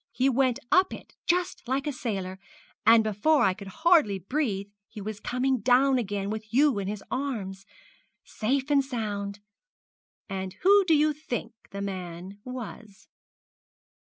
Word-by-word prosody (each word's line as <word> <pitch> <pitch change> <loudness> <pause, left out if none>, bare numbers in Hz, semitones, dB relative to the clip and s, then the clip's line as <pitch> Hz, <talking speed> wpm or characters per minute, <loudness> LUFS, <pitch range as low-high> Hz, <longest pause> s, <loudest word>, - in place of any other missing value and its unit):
He 260 +2 +2
went 260 -1 +2
up 370 +1 +4
it - - -14
just 355 0 +1
like 270 +3 0
a 295 - 0
sailor, 190 -7 -4 0.5
and 225 0 +8
before 220 +9 +2
I 190 - +4
could 200 +1 -10 0.2
hardly 310 - +5
breathe 200 - -2 0.2
he 220 - -10
was 210 +1 -5
coming 255 +2 0
down 255 +4 +4
again 200 -2 -2
with 215 0 -6
you 275 -2 +4
in 195 - -3
his 205 0 -4
arms, 205 -8 -3 0.6
safe 265 +6 -1
and 280 -1 +4
sound. 205 -5 -4 0.9
And 190 -2 -4
who 400 +1 +6
do 330 -3 +4
you 305 +1 +3
think 245 -6 -5 0.2
the 200 - -6
man 185 0 -6
was?' 230 -5 -9
230 Hz, 150 wpm, -27 LUFS, 200-275 Hz, 0.9 s, and